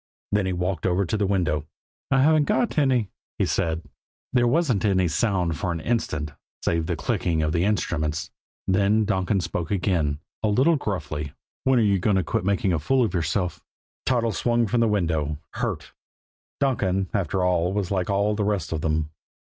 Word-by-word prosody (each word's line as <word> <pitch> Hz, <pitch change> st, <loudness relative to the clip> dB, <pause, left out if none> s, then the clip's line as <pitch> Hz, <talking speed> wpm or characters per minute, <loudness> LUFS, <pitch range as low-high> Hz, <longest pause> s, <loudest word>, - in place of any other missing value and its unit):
Then 105 Hz, -2 st, +1 dB
he 95 Hz, -, 0 dB
walked 90 Hz, +1 st, -1 dB
over 95 Hz, +2 st, +2 dB
to 90 Hz, -, -2 dB
the 105 Hz, -2 st, +1 dB
window. 80 Hz, -6 st, 0 dB, 0.4 s
"I 135 Hz, -1 st, +4 dB
haven't 155 Hz, 0 st, +4 dB
got 215 Hz, -2 st, +1 dB
any," 125 Hz, -8 st, +2 dB, 0.3 s
he -, -, +2 dB
said. 80 Hz, 0 st, -1 dB, 0.5 s
There 120 Hz, -1 st, +4 dB
wasn't 125 Hz, -, +2 dB
any 95 Hz, -4 st, +3 dB
sound 85 Hz, -2 st, 0 dB
for 90 Hz, -1 st, -1 dB
an 85 Hz, -, -3 dB
instant, 80 Hz, -7 st, -1 dB, 0.3 s
save 85 Hz, -1 st, +1 dB
the -, -, 0 dB
clicking 80 Hz, -3 st, 0 dB
of 75 Hz, -, 0 dB
the 85 Hz, +3 st, +1 dB
instruments; 80 Hz, -6 st, -1 dB, 0.4 s
then 100 Hz, +3 st, +3 dB
Donkin 95 Hz, -1 st, +1 dB
spoke 85 Hz, -2 st, -3 dB
again 85 Hz, -7 st, 0 dB, 0.2 s
a 110 Hz, -, +1 dB
little 130 Hz, +11 st, +4 dB
gruffly: 75 Hz, -, -3 dB, 0.3 s
"When 130 Hz, -1 st, +4 dB
are 115 Hz, -, +4 dB
you 100 Hz, -2 st, +3 dB
going 100 Hz, +2 st, +2 dB
to 95 Hz, -, +2 dB
quit 85 Hz, -, -1 dB
making 100 Hz, -1 st, +1 dB
a 80 Hz, -, +1 dB
fool 130 Hz, -, +2 dB
of 105 Hz, -, -3 dB
yourself?" 90 Hz, +1 st, -1 dB, 0.4 s
Toddles 115 Hz, -4 st, +1 dB
swung 120 Hz, -1 st, +2 dB
from 115 Hz, +3 st, 0 dB
the 115 Hz, -, +4 dB
window, 80 Hz, -7 st, 0 dB
hurt. -, -, -4 dB, 0.7 s
Donkin, 95 Hz, -8 st, +1 dB
after 95 Hz, -1 st, 0 dB
all, 90 Hz, -1 st, +2 dB
was 100 Hz, -2 st, -2 dB
like 95 Hz, +1 st, 0 dB
all 100 Hz, +2 st, +2 dB
the 105 Hz, 0 st, -1 dB
rest 100 Hz, -5 st, -1 dB
of 80 Hz, -2 st, -2 dB
them. 75 Hz, -1 st, 0 dB
95 Hz, 185 wpm, -24 LUFS, 85-110 Hz, 0.7 s, I